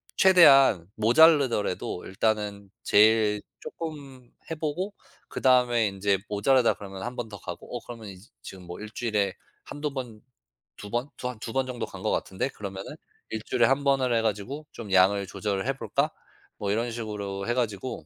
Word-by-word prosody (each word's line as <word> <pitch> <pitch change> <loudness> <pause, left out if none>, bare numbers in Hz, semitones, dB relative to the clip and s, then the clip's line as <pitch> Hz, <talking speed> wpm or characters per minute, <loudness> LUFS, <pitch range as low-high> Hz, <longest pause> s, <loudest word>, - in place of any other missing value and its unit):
최대한 135 - +6
모자라더라도 120 - +3
일단은 100 0 -2
제일 105 0 +4 0.2
쪼끔 140 -6 -8 0.2
해 - - -1
보고 170 +7 -3 0.3
그다음에 125 -3 +3
인제 95 0 0
모자라다 120 +4 +3
그러면 95 -2 -9
1 125 +1 -5
번 115 -2 -4
더 100 - -9
가고 85 +8 -8
어 - - -6
그러면 115 -3 -9
이제 95 +4 -13 0.2
지금 95 -1 -10
뭐 90 - -8
1 110 - -7
주일에 105 -5 -1 0.3
1-2 145 0 -4
번 120 -5 -6 0.6
2 105 - -9
번 120 +4 -1
두 125 - -4
한 120 - -8
2 115 - -6
번 135 -1 +1
정도 125 -2 -4
간 - - -11
것 - - +1
같은데 95 +6 -1
그러면은 95 -4 -7 0.3
'1 110 -1 -4
주일에 120 - +3
1 135 +1 +1
번을 130 -3 +2
해 115 - +3
가지고 115 +8 -3
좀 110 -5 -9
양을 95 +1 +4
조절을 100 +2 -3
해볼까?' 140 +2 -1 0.5
뭐 100 -1 -2
이런 115 +3 0
식으로 105 -4 -5
해 120 - +1
가지고 120 -1 -3
115 Hz, 305 characters per minute, -27 LUFS, 100-130 Hz, 0.6 s, 최대한